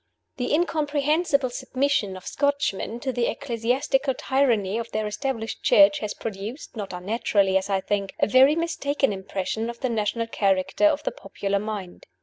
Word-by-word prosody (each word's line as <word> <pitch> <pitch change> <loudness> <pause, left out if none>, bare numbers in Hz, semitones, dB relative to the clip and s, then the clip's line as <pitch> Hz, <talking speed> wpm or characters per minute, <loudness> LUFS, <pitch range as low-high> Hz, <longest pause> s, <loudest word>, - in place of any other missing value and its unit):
THE 245 - -2
incomprehensible 300 -2 +1
submission 260 -7 -1
of 185 - -13
Scotchmen 280 -6 -1
to 265 - -1
the 245 -1 +1
ecclesiastical 265 +2 0
tyranny 235 -7 +1
of 230 0 -5
their 215 0 -1
Established 225 +1 -3
Church 200 0 +6
has 210 -2 -4
produced 220 +7 -6
not 205 -3 -5
unnaturally, 195 +1 +1
as 190 +1 +1
I 195 -1 +1
think 200 0 -2
a - - +4
very 265 +6 +5
mistaken 290 -7 0
impression 195 +3 -3
of 235 - -8
the 260 - 0
national 230 0 -1
character 200 +6 +2
in 300 - +1
the - - -1
popular 195 0 -3
mind. 205 -4 -6
230 Hz, 155 wpm, -25 LUFS, 200-280 Hz, -, Church